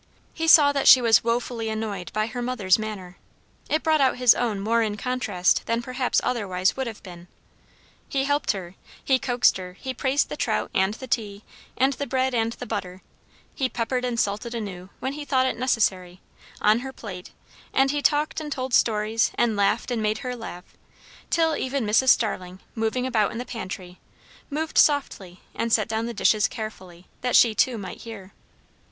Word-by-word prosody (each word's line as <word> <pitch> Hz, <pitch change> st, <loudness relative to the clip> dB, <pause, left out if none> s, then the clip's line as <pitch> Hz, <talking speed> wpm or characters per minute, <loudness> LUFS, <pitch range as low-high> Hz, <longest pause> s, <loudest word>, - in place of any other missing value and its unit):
He 325 Hz, 0 st, -3 dB
saw 295 Hz, -3 st, +8 dB
that 280 Hz, -1 st, 0 dB
she 260 Hz, -, +10 dB
was 230 Hz, -3 st, +4 dB
wofully 230 Hz, -1 st, -2 dB
annoyed 215 Hz, -4 st, -4 dB
by 215 Hz, 0 st, 0 dB
her 235 Hz, +2 st, -5 dB
mother's 230 Hz, -6 st, +1 dB
manner; 195 Hz, -5 st, -6 dB, 0.5 s
it 310 Hz, -, 0 dB
brought 315 Hz, -2 st, +3 dB
out 260 Hz, -2 st, +3 dB
his 250 Hz, -2 st, +6 dB
own 225 Hz, -5 st, -1 dB
more 230 Hz, +4 st, +1 dB
in 210 Hz, -2 st, -1 dB
contrast 210 Hz, -6 st, 0 dB
than 230 Hz, +1 st, 0 dB
perhaps 255 Hz, +1 st, 0 dB
otherwise 190 Hz, -6 st, 0 dB
would 265 Hz, -1 st, -3 dB
have 225 Hz, -2 st, -8 dB
been. 175 Hz, -2 st, -11 dB, 0.8 s
He 270 Hz, -1 st, 0 dB
helped 285 Hz, -8 st, +1 dB
her, 180 Hz, -3 st, -7 dB, 0.3 s
he 265 Hz, -1 st, +3 dB
coaxed 250 Hz, -5 st, +2 dB
her, 180 Hz, -1 st, -8 dB
he 260 Hz, -1 st, -4 dB
praised 270 Hz, +3 st, 0 dB
the -, -, -4 dB
trout, -, -, -1 dB
and 190 Hz, +2 st, +1 dB
the 260 Hz, -, -8 dB
tea, 210 Hz, -5 st, -3 dB, 0.3 s
and 265 Hz, +2 st, +3 dB
the 285 Hz, +1 st, -5 dB
bread, 260 Hz, 0 st, 0 dB
and 230 Hz, -1 st, 0 dB
the 250 Hz, -, -8 dB
butter; 190 Hz, -5 st, -5 dB, 0.5 s
he 260 Hz, -2 st, -1 dB
peppered 250 Hz, +2 st, -2 dB
and 245 Hz, -2 st, -1 dB
salted 215 Hz, +4 st, -2 dB
anew, 190 Hz, -5 st, -6 dB
when 265 Hz, -, -3 dB
he 295 Hz, +1 st, -6 dB
thought 265 Hz, -2 st, +1 dB
it 260 Hz, -, 0 dB
necessary, 190 Hz, -7 st, 0 dB, 0.4 s
on 215 Hz, +2 st, +4 dB
her 265 Hz, +2 st, -6 dB
own -, -, -11 dB
plate; 185 Hz, -7 st, -9 dB, 0.4 s
and 270 Hz, 0 st, +3 dB
he 290 Hz, 0 st, -1 dB
talked 295 Hz, +3 st, +1 dB
and 300 Hz, -1 st, -6 dB
told 260 Hz, -2 st, -4 dB
stories, 220 Hz, 0 st, +2 dB
and 230 Hz, -2 st, +1 dB
laughed 200 Hz, +4 st, +1 dB
and 235 Hz, -2 st, -1 dB
made 215 Hz, 0 st, 0 dB
her 250 Hz, 0 st, -3 dB
laugh, 185 Hz, -6 st, -8 dB, 0.6 s
till 325 Hz, -1 st, +2 dB
even 260 Hz, -3 st, -2 dB
Mrs. 225 Hz, +5 st, +3 dB
Starling, 185 Hz, -6 st, +1 dB
moving 225 Hz, +3 st, -1 dB
about 225 Hz, -5 st, +1 dB
in -, -, -6 dB
the 245 Hz, -, -4 dB
pantry, 185 Hz, -6 st, -7 dB, 0.5 s
moved 310 Hz, +2 st, -1 dB
softly 200 Hz, -, +1 dB
and 230 Hz, -, -2 dB
set -, -, +3 dB
down 220 Hz, 0 st, -2 dB
the 235 Hz, -, -4 dB
dishes 215 Hz, +1 st, +3 dB
carefully, 185 Hz, -6 st, -8 dB, 0.2 s
that 250 Hz, 0 st, 0 dB
she 230 Hz, -2 st, +6 dB
too 235 Hz, +3 st, +1 dB
might 195 Hz, -3 st, -8 dB
hear. 200 Hz, -4 st, -10 dB
230 Hz, 190 wpm, -24 LUFS, 205-260 Hz, 0.8 s, she